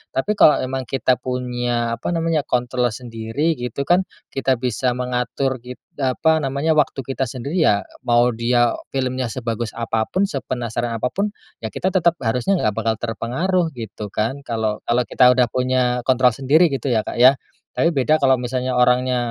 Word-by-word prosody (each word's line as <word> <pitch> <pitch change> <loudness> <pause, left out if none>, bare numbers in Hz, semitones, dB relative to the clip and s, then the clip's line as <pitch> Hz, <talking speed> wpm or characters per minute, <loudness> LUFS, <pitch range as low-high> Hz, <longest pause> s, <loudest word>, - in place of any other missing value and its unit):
tapi 135 +10 0
kalau 150 - +6
emang 130 0 -3
kita 130 0 +1
punya 120 -2 -2
apa 115 - -3
namanya, 165 -2 0
kontrol 125 0 0
sendiri 120 +7 -2
gitu 125 +2 -4
kan, 180 +2 +4 0.3
kita 135 -1 0
bisa 125 +1 0
mengatur 125 +2 -2
it 125 0 -9 0.2
apa 145 +4 +2
namanya, 140 +4 0
waktu 140 -2 +1
kita 135 +1 -3
sendiri 130 +7 -5
ya, 100 -8 +3 0.2
mau 120 0 +4
dia 120 +1 +2 0.2
filmnya 130 -1 -1
sebagus 115 -2 -3
apa 115 -1 -1
pun, 195 - 0
sepenasaran 120 -3 -3
apa 125 - +1
pun, 205 +6 -2 0.3
ya 110 - -4
kita 185 - -1
tetap 175 -3 +2
harusnya 125 +10 0
nggak 105 -1 0
bakal 115 0 +1
terpengaruh 160 +10 -1
gitu 110 -3 -7
kan 125 +6 -2
kalau 110 -3 -2
kalau 120 +1 +2
kita 125 +1 +4
udah 125 0 +3
punya 125 -1 0
kontrol 130 -1 +4
sendiri 150 +7 +4
gitu 135 -3 -4
ya, 110 - +2
Kak - - -6
ya. 125 +3 +7 0.4
Tapi 165 - +2
beda 150 +4 +2
kalau 130 -1 +4
misalnya 125 +1 -2
orangnya 125 +1 +3
125 Hz, 170 wpm, -21 LUFS, 120-135 Hz, 0.4 s, ya